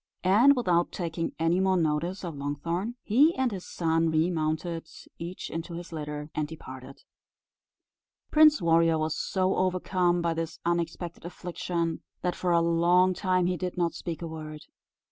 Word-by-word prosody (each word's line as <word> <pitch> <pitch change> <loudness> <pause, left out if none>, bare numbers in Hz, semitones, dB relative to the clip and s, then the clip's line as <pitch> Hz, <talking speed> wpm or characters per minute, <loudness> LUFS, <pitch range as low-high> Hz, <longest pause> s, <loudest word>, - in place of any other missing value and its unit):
And 225 +10 +6
without 175 -8 +1
taking 165 -2 -3
any 165 +2 +2
more 190 0 +3
notice 170 +4 -1
of 170 - -4
Longthorn, 165 +10 -3
he 285 +10 +4
and 260 -2 +1
his 190 -3 -6
son 165 -1 +1
remounted 160 0 -1 0.3
each 175 +2 -6
into 165 +1 -5
his 175 +1 -8
litter, 150 -1 -5
and 155 -1 -1
departed. 135 -4 -10 1.3
Prince 305 - +6
Warrior 165 -1 +4
was 155 0 -1
so 185 +2 0
overcome 185 -1 +1
by 170 -1 +1
this 165 0 -4
unexpected 170 0 -2
affliction, 170 -1 -3 0.2
that 180 - +1
for 180 - -1
a 170 0 +4
long 175 +2 +4
time 185 -1 +1
he 180 0 0
did 180 +1 -4
not 170 -1 +1
speak 170 -1 -5
a - - -3
word. 155 -1 -7
170 Hz, 155 wpm, -28 LUFS, 160-185 Hz, 1.3 s, And